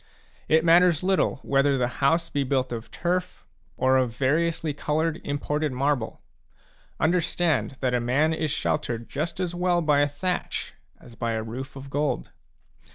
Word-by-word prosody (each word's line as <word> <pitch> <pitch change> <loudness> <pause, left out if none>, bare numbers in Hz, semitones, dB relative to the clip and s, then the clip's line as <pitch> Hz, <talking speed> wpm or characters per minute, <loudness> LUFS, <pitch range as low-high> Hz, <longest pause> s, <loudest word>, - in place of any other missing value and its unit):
It 160 +1 +3
matters 170 0 +5
little 190 0 +2
whether 140 0 +2
the 125 -1 +1
house 165 +4 +3
be 145 - 0
built 130 -2 0
of 115 0 -6
turf, 180 +1 -2 0.3
or 130 0 +3
of 125 -3 0
variously 155 +3 +1
coloured 155 +3 -1
imported 150 +1 -1
marble; 135 -2 -1 0.8
understand 170 -4 +1
that 130 -2 +1
a 125 - +2
man 135 +7 +2
is 155 -1 -1
sheltered 120 -5 -1
just 155 +5 -4
as 180 -2 -1
well 175 0 +1
by 150 -2 +3
a 145 - +4
thatch 160 +6 -3 0.3
as 120 - -15
by 115 0 -2
a 110 0 -2
roof 130 +5 -7
of 135 0 -9
gold. 145 0 -1
145 Hz, 160 wpm, -25 LUFS, 130-165 Hz, 0.8 s, matters